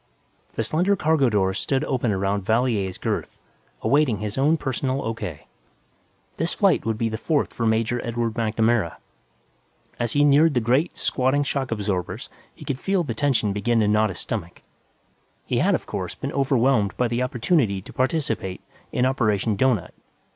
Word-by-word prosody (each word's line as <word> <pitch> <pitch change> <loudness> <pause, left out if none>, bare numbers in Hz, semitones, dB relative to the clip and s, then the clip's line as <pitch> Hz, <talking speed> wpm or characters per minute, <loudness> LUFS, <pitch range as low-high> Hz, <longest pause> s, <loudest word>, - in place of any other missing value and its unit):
The 115 - -1
slender 180 - +2
cargo 155 -7 +2
doors 95 -2 +1
stood 135 -1 0
open 125 -4 0
around 100 +1 0
Valier's 110 -3 0
girth, - - -3 0.5
awaiting 140 -6 +3
his 105 0 -4
own 150 +5 +3
personal 135 -1 -2
O.K. 105 -9 -5 0.9
This 165 +2 -1
flight 195 - +2
would 110 -1 0
be 115 - 0
the 110 0 -4
fourth 155 -3 0
for 115 - -1
Major 115 +2 +1
Edward 115 -1 -2
MacNamara; 110 -4 +1 1.0
as 120 -2 -1
he 145 - +4
neared 145 +1 +5
the - - +4
great, 130 +9 +1
squatting 130 +2 +1
shock 140 -2 -2
absorbers 100 -5 -3 0.3
he - - -12
could 135 -2 -3
feel 195 +1 +1
the 120 - -3
tension 115 -5 +1
begin 115 +3 +1
to 105 - +2
knot 105 +1 +3
his 90 - -6
stomach. 90 -6 -5 0.8
He - - 0
had, - - +3
of - - -4
course, - - -5
been - - -5
overwhelmed 130 -6 +2
by 125 - +2
the 120 +1 -1
opportunity 125 - +1
to - - -12
participate 130 - -1 0.3
in 125 - +1
Operation 110 -5 +1
Doughnut. 120 -4 +1
120 Hz, 165 wpm, -23 LUFS, 105-135 Hz, 1.0 s, neared